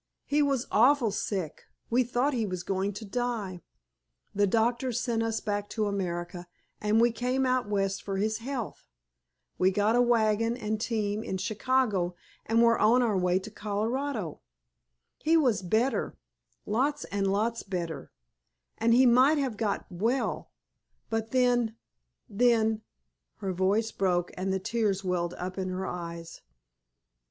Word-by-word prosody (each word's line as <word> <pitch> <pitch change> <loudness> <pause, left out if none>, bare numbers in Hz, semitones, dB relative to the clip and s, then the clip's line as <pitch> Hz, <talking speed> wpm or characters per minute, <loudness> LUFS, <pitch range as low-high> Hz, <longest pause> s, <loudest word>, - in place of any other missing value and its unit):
He 295 +1 +2
was 275 -4 +1
awfully 245 0 +4
sick, 190 -6 -3 0.3
we 250 +2 +4
thought 250 +4 0
he 230 -4 0
was 185 -2 -4
going 195 +1 -1
to 210 +3 -7
die. 210 -5 -3 0.7
The 205 0 +2
doctors 235 +3 +1
sent 235 -2 -1
us 225 -1 -1
back 205 -1 -2
to 215 -2 -1
America, 175 -3 -3 0.3
and 210 +1 +2
we 235 +1 +5
came 250 +3 0
out 255 -4 +1
West 195 -1 0
for 195 -1 -4
his 215 +3 0
health. 245 -1 -5 0.7
We 185 - +5
got 205 +4 +2
a 245 - +5
wagon 230 -1 +2
and 215 -2 -3
team 215 -2 -1
in 190 -4 -3
Chicago 205 -2 0 0.3
and 230 +1 +4
were 230 0 +4
on 240 +4 +5
our 220 -4 +1
way 180 -1 +2
to 200 +3 -6
Colorado. 215 - -3 0.8
He 325 +2 +3
was 255 -10 +2
better—lots 245 +5 -2
and 195 -1 -1
lots 225 +3 0
better, 170 -7 -5 0.7
and 230 +1 +4
he 260 +2 +6
might 255 +5 +5
have 265 -6 -1
got 210 -1 -1
well, 225 +9 -1 0.6
but 225 0 -1
then—then——" 225 - 0 0.5
Her 195 -3 -3
voice 200 +5 +1
broke 180 -2 0
and 190 +1 -2
the 190 - +1
tears 200 -1 -1
welled 180 -2 -1
up 185 +2 -5
into 185 -1 -2
her 190 +1 -3
eyes. 170 -2 -6
215 Hz, 145 wpm, -28 LUFS, 190-240 Hz, 0.8 s, he